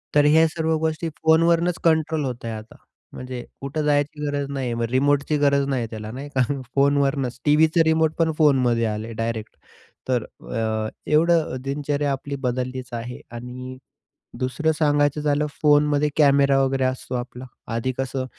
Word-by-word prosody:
तर 145 0 +5
ह्या 160 +2 +5
सर्व 160 0 -1
गोष्टी 160 +1 -2 0.2
फोनवरनच 165 +2 +3
कंट्रोल 160 -2 +2
होत 125 -2 -5
आहे 115 - -3
आता. 110 +1 -9 0.4
म्हणजे 125 -1 -6 0.2
कुठे 140 +3 -3
जायची 150 0 0
गरज 145 -1 -2
नाहीये. 130 -3 -2
मग 115 0 -2
रिमोटची 145 +3 +2
गरज 140 -1 +3
नाहीये 125 -4 -1
त्याला, 110 -1 -6
नाही 135 +4 -7
का, 130 - +3 0.3
फोनवरनच. 140 -2 +1
टीव्हीचं 155 +2 +4
रिमोट 160 -1 +2
पण 160 -1 +3
फोनमध्ये 125 -6 +3
आलंय 110 +1 -3
डायरेक्ट. 115 -1 -4 0.5
तर 125 -3 +1
अ, 110 -2 -3 0.2
एवढं 165 -2 +3
दिनचर्या 145 +1 -1
आपली 140 +1 -4
बदललीच 125 0 -3
आहे 120 +1 -5
आणि 125 +2 -8 0.6
दुसरं 130 +5 0
सांगायचं 145 -1 +2
झालं, 150 0 +1 0.2
फोनमध्ये 150 0 +3
कॅमेरा 140 -2 +4
वगैरे 135 0 0
असतो 130 0 -3
आपला. 125 +1 -6 0.3
आधी 130 +3 -1
कसं 135 0 -2
140 Hz, 150 wpm, -23 LUFS, 125-150 Hz, 0.6 s, तर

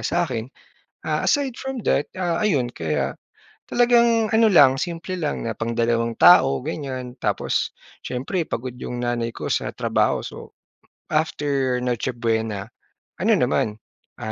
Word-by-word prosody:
sa'kin. 130 -9 -1 0.6
Ah, - - -1
aside 275 -4 +1
from 265 -4 -4
that, 145 - +1
ah, 175 -2 -1
ayon, 140 -13 +1
kaya 80 -3 -2 0.5
talagang 235 -2 +3
ano 225 0 +4
lang, 140 -10 +6
simple 175 +3 -4
lang 155 -4 -2
na 115 -2 -4
pangdalawang 115 0 0
tao, 135 -7 +7
ganyan. 130 -4 -5
Tapos, - - -1 0.3
siyempre 145 +7 -2
pagod 125 +1 -5
'yong 125 0 -5
nanay 120 -1 -1
ko - - -5
sa - - -1
trabaho, - - +1
so - - -9 0.5
after 140 -4 0
Noche 125 0 -1
Buena, 110 -4 -2 0.5
ano - - +2
naman, 105 - +1 0.5
ah, 110 - -3
130 Hz, 135 wpm, -23 LUFS, 120-175 Hz, 0.6 s, tao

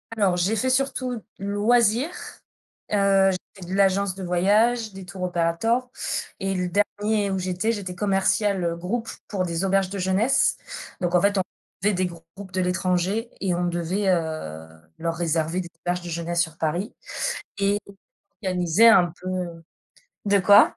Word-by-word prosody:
Alors, 190 -4 +2
j'ai 190 +5 +1
fait 255 +5 0
surtout 255 -3 0 0.2
loisirs. 220 - +2 0.8
Heu, 195 -1 +4
j'ai 185 - -1 0.2
fait 175 - -7
de - - -4
l'agence 195 -1 +2
de 195 - -7
voyage, 210 +5 +2
des 190 -1 -9
tours 180 +1 -7
operators 180 +8 0 0.5
et 195 0 -1
le 180 -1 -1
dernier 205 +2 +1
où 190 - 0
j'étais, 185 +4 0
j'étais 190 -4 -5
commerciale, 195 0 +1
heu, 170 -1 0
groupe 225 +7 -3 0.2
pour 190 -3 -1
des 170 +2 -1
auberges 195 -1 +2
de 200 - -5
jeunesse. 190 +8 +2 0.5
Donc 175 -1 0
en 175 - +5
fait, 200 0 +2
on - - +4 0.4
avait 210 0 +3
des 185 0 +1
groupes 175 +3 -12
de 185 - +1
l'étranger 185 +5 0
et 190 -2 +1
on 175 0 0
devait, 175 +4 -1
heu, 155 - -1 0.3
leur 165 0 -1
réserver 165 +1 0
des 175 - -8 0.2
auberges 175 0 0
de 175 - -7
jeunesse 170 +1 -1
sur 160 -2 -3
Paris 170 +7 -2 0.6
et 200 +1 +2 0.7
organiser 180 +3 +4
un 180 -7 +6
peu, 185 - -7
heu 175 -3 -4 0.6
de 200 0 +4
quoi? 205 +3 +6
190 Hz, 165 wpm, -24 LUFS, 175-205 Hz, 0.8 s, un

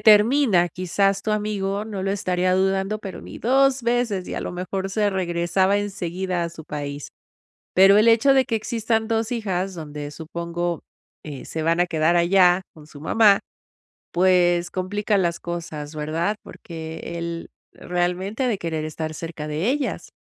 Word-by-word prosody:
termina, 215 -3 +5
quizás, 195 +3 0
tu 215 - -2
amigo 205 -1 -1
no 205 -3 -5
lo 195 - 0
estaría 185 -2 +1
dudando, 195 +2 +1
pero 195 -3 -7
ni - - -10
2 270 +2 +3
veces 235 -5 0
y, - - -4
a - - -3
lo - - -4
mejor, 190 +2 -3
se 210 +1 +1
regresaba 185 +1 +1
en 205 0 -2
seguida 180 -1 -3
a 170 - -1
su 165 -1 -11
país. 145 -1 -5 0.7
Pero 195 +2 +7
el 215 +2 +5
hecho 230 +5 +5
de 265 -1 +4
que 230 -4 -1
existan 225 0 -1
2 225 -1 0
hijas 195 -5 -2
donde 150 -3 -6
supongo, 170 +2 -4 0.4
eh, 145 -4 -8
se 160 - -4
van 165 +2 +2
a 175 - +4
quedar 160 0 +2
allá 180 +1 +5
con 155 -2 -14
su 150 -1 -13
mamá, 200 +5 +5 0.7
pues, 175 -1 +3
complica 205 +2 0
las 170 -2 0
cosas, 165 -3 -6
¿verdad?, 160 +7 -1
porque 160 -1 -8 0.2
él, 170 0 -5 0.2
realmente, 180 +6 -2
ha - - +2
de 215 -5 0
querer 160 -3 -3
estar 155 0 -4
cerca 165 -1 -6
de 155 +7 -1
ellas. 280 +1 -2
185 Hz, 170 wpm, -23 LUFS, 170-210 Hz, 0.7 s, Pero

